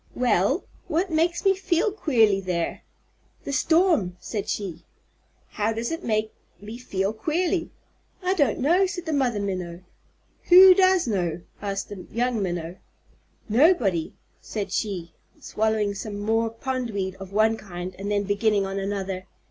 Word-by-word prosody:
"Well, 245 - +2 0.2
what 345 +4 0
makes 335 +4 +1
me 390 - +6
feel 380 +1 +1
queerly 225 - +2
there?" 180 -3 -2 0.6
"The 280 - -4
storm," 320 - +2
said 205 +3 -5
she. 190 -6 -4 0.7
"How 215 +1 -1
does 230 +4 -3
it 330 - -4
make 215 -1 -1 0.3
me 215 +4 -9
feel 195 -4 -2
queerly?" 335 - -1 0.5
"I 365 +1 +2
don't 285 - +2
know," 350 +8 +3
said 355 -1 -6
the 320 - -2
Mother 250 -7 +1
Minnow. 185 -3 -4 0.6
"Who 370 +1 +9
does 375 -1 +4
know?" 175 -6 -1 0.2
asked 195 -1 -3
the 200 -3 -9
young 240 -1 0
Minnow. 175 -1 -3 0.7
"Nobody," 225 - +3 0.3
said 200 -3 -5
she, 185 -5 -3 0.3
swallowing 215 -1 0
some 205 0 -6
more 225 +2 +1
pondweed 230 -5 -3
of 195 -1 -10
one 220 +2 +3
kind 185 -3 -7
and 200 +1 -4
then 205 -1 +1
beginning 205 0 +1
on 195 0 -3
another. 195 -1 -4
215 Hz, 145 wpm, -25 LUFS, 195-300 Hz, 0.7 s, Who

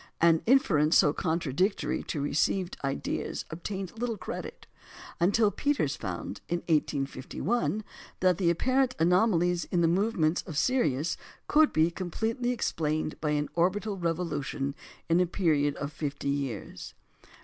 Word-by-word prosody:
" - - -44
An 165 -1 +3
inference 170 - +4
so 150 -5 +5
contradictory 170 +5 0
to 155 - -3
received 170 +5 0
ideas 135 0 -3
obtained 190 +5 -5
little 235 -2 -2
credit, 185 - -7 0.5
until 205 +4 +3
Peters 240 - 0
found, 95 0 -5
in 175 0 -1
1851, 155 - -1 0.4
that 185 -2 +3
the 175 -3 +3
apparent 255 +8 +2
anomalies 180 -1 +3
in 175 - 0
the 165 - +4
movements 180 -2 +1
of 160 -5 -5
Sirius 160 - +1 0.3
could 310 0 +5
be 160 +2 +3
completely 225 +8 -2
explained 155 -10 -1
by 150 - 0
an 150 0 0
orbital 195 +4 +1
revolution 165 -6 -2 0.3
in 165 +1 +3
a 180 - +3
period 150 -6 +1
of 145 +1 -5
fifty 145 -2 -3
years. 140 -7 -4
170 Hz, 135 wpm, -29 LUFS, 150-200 Hz, 0.5 s, so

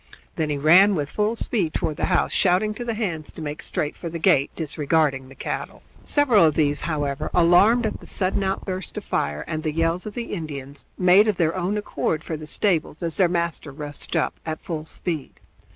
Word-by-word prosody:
Then 155 -1 -1
he 145 - -1
ran 180 +8 +6
with 145 -3 -2
full 210 +2 0
speed 195 -9 -1
toward 150 - -1
the - - 0
house, 180 - +1
shouting 195 +3 +2
to 240 - -6
the 230 -2 -2
hands 170 -9 -3
to - - -8
make 150 0 -5
straight 150 - -3
for 170 - -6
the 170 - -5
gate, 140 -4 +3
disregarding 150 -3 0
the 135 - -13
cattle. - - -5 0.2
Several 255 - +4
of 155 -2 +4
these, 145 -2 +2
however, 145 -4 -2
alarmed 190 +8 +5
at 215 - -2
the - - -13
sudden 190 0 -1
outburst 190 -1 -3
of - - -5
fire 75 +1 -1
and 155 - -3
the 155 -1 -1
yells 165 +4 0
of 210 - -7
the 235 -1 -4
Indians, 140 -6 -6
made 185 +3 +6
of 210 -4 +1
their 165 0 +1
own 185 +3 -1
accord 160 -6 -2
for 160 - -4
the 155 0 -8
stables 165 -2 0
as 165 -2 -2
their 185 -3 +4
master 170 -3 -2
rushed 145 +1 -6
up - - +1
at 155 -1 -4
full 155 -3 -4
speed. 160 -5 -5
165 Hz, 210 wpm, -23 LUFS, 150-190 Hz, 0.2 s, ran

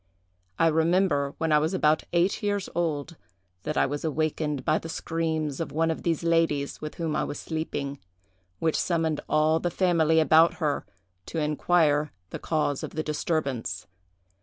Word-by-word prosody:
I - - +3
remember, 160 -3 +2
when 160 -1 -1
I 150 - +6
was 160 +5 0
about 155 -3 +2
eight 175 +3 +1
years 205 -2 -1
old, 160 -1 -2 0.4
that 150 - -3
I - - +4
was 145 +2 -4
awakened 155 -3 -1
by - - +2
the 165 - -8
screams 160 -3 -2
of 165 - -3
one 165 +2 +1
of 160 - -4
these 165 -1 -1
ladies, 165 -4 +1
with 155 0 -6
whom 165 -3 -2
I - - +1
was - - -4
sleeping, 145 -3 -4 0.6
which 160 -1 0
summoned 165 -3 0
all 155 +1 +3
the 175 - -1
family 165 -3 +3
about 160 +1 +5
her 150 -4 -1 0.4
to - - -5
inquire 150 -1 +2 0.2
the - - -5
cause 150 -3 -1
of - - -7
the 155 - -1
disturbance. 150 -5 -2
160 Hz, 165 wpm, -26 LUFS, 150-165 Hz, 0.6 s, I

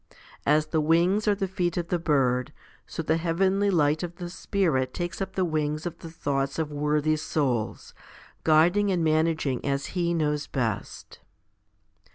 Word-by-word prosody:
As 150 +1 +4
the 155 0 0
wings 175 +7 +2
are 205 - +4
the 195 -1 -2
feet 180 -2 -1
of 170 -1 -2
the 175 - 0
bird, 135 -5 +1 0.4
so 165 - -5
the 160 +1 +1
heavenly 190 +4 +1
light 155 -4 +2
of 175 -1 -5
the 175 -1 -7
Spirit 160 -10 0
takes 175 +1 -4
up 195 - -4
the 185 - +1
wings 155 -1 -1
of 170 -1 -5
the 165 - -9
thoughts 140 -4 -2
of 160 -2 -2
worthy 150 +1 +1
souls, 135 -7 -2 0.5
guiding 175 +6 +4
and 175 -3 +1
managing 155 -4 +1
as 140 0 -2
He 170 -1 0
knows 150 -2 0
best. 115 -7 -4
160 Hz, 165 wpm, -26 LUFS, 150-175 Hz, 0.5 s, As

